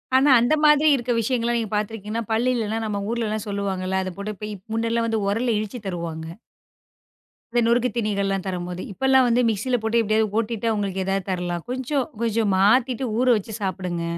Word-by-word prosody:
ஆனா, 270 Hz, +3 st, +5 dB
அந்த 245 Hz, +6 st, +3 dB
மாதிரி 300 Hz, +1 st, +6 dB
இருக்க 245 Hz, -1 st, -2 dB
விஷயங்கள்லாம் 235 Hz, 0 st, 0 dB
நீங்கப் 215 Hz, -2 st, -3 dB
பாத்துருக்கீங்கலா, 215 Hz, +1 st, -3 dB
பல் 235 Hz, +3 st, +2 dB
இல்லனா, 225 Hz, -2 st, -1 dB
நம்ம 205 Hz, -2 st, -2 dB
ஊர்ல 235 Hz, -1 st, -1 dB
எல்லாம் 215 Hz, -1 st, -3 dB
சொல்லுவாங்கல? 190 Hz, -2 st, -1 dB
அதைப் 185 Hz, -1 st, -6 dB
போட்டு 210 Hz, +1 st, -5 dB, 0.2 s
முன்னெல்லாம் 230 Hz, 0 st, 0 dB, 0.2 s
உரல்ல 230 Hz, +3 st, +1 dB
இடிச்சு 215 Hz, +3 st, -5 dB
தருவாங்க. 165 Hz, -3 st, -4 dB, 1.2 s
அந்த 240 Hz, -, +2 dB
நொறுக்குத்தினிகள் 230 Hz, -4 st, +1 dB
எல்லாம் 195 Hz, -1 st, -2 dB
தரும்போது, 180 Hz, -1 st, -4 dB
இப்ப 200 Hz, -, -9 dB
எல்லாம் 265 Hz, -1 st, +5 dB
வந்து 240 Hz, +1 st, +3 dB
மிக்ஸி 210 Hz, +3 st, -2 dB
யில 250 Hz, -, +3 dB
போட்டு 225 Hz, +1 st, +2 dB
எப்படியாவது 215 Hz, -1 st, +1 dB
ஓட்டிட்டு 225 Hz, 0 st, -1 dB
உங்களுக்கு 195 Hz, -2 st, -2 dB
ஏதாவது 195 Hz, 0 st, -1 dB
தரலாம். 175 Hz, -2 st, -3 dB
கொஞ்சம் 260 Hz, +1 st, -1 dB, 0.2 s
கொஞ்சம் 225 Hz, -2 st, +1 dB
மாத்திட்டு 250 Hz, +5 st, +3 dB
ஊற 255 Hz, -, +2 dB
வச்சு 215 Hz, +2 st, -7 dB
சாப்பிடுங்க 180 Hz, -3 st, -3 dB
220 Hz, 170 wpm, -23 LUFS, 195-235 Hz, 1.2 s, மாதிரி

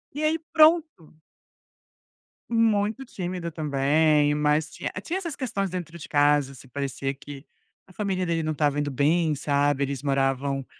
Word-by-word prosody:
E 305 Hz, -, -3 dB
aí 315 Hz, +1 st, +2 dB
pronto. 310 Hz, -, +2 dB, 1.3 s
Muito 225 Hz, +1 st, +1 dB
tímida 180 Hz, -7 st, -5 dB
também, 150 Hz, 0 st, +2 dB
mas 150 Hz, +1 st, +1 dB
tinha -, -, -5 dB
tinha 345 Hz, -, -2 dB
essas 340 Hz, -6 st, -4 dB
questões 210 Hz, -7 st, -2 dB
dentro 170 Hz, -2 st, -6 dB
de 155 Hz, -, -9 dB
casa, 145 Hz, -2 st, +2 dB
se -, -, -14 dB
parecia 135 Hz, 0 st, -3 dB
que 140 Hz, +1 st, -11 dB, 0.4 s
a 185 Hz, -, -19 dB
família 190 Hz, -2 st, -2 dB
dele 165 Hz, -1 st, 0 dB
não 155 Hz, 0 st, -1 dB
estava 145 Hz, -1 st, +1 dB
indo 145 Hz, 0 st, -1 dB
bem, 150 Hz, +4 st, +2 dB
sabe, 145 Hz, -1 st, +1 dB
eles 140 Hz, -2 st, -3 dB
moravam 135 Hz, -1 st, 0 dB
155 Hz, 150 wpm, -25 LUFS, 140-195 Hz, 1.3 s, aí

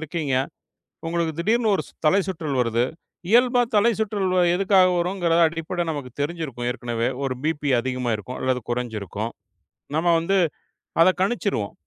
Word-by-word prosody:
இருக்கீங்க. 155 Hz, -3 st, -2 dB, 0.7 s
உங்களுக்குத் 165 Hz, -1 st, -1 dB
திடீர்னு 220 Hz, +3 st, +2 dB
ஒரு -, -, -2 dB
சு -, -, -19 dB
தலைசுற்றல் 165 Hz, -6 st, +1 dB
வருது. 115 Hz, 0 st, +1 dB, 0.5 s
இயல்பா 245 Hz, +2 st, +5 dB, 0.2 s
தலைசுற்றல் 210 Hz, -3 st, +1 dB, 0.2 s
எதுக்காக 190 Hz, 0 st, +4 dB
வரும்கிற 175 Hz, -1 st, 0 dB
அடிப்பட 165 Hz, +2 st, -3 dB
நமக்குத் 140 Hz, -5 st, -6 dB
தெரிஞ்சிருக்கும். 145 Hz, -6 st, -3 dB
ஏற்கனவே, 120 Hz, -2 st, -2 dB, 0.2 s
ஒரு 130 Hz, -1 st, -1 dB
பிபி 150 Hz, -2 st, -1 dB
அதிகமா 125 Hz, -1 st, -2 dB
இருக்கும் 115 Hz, +5 st, -8 dB
அல்லது 130 Hz, -1 st, 0 dB
கொறஞ்சிருக்கும். 110 Hz, -3 st, -3 dB, 0.7 s
நம்ம 165 Hz, +2 st, +1 dB
வந்து 195 Hz, +4 st, +1 dB, 0.7 s
அதக் 185 Hz, +2 st, +4 dB
கணிச்சுருவோம். 195 Hz, -, -1 dB
160 Hz, 125 wpm, -23 LUFS, 125-190 Hz, 0.7 s, இயல்பா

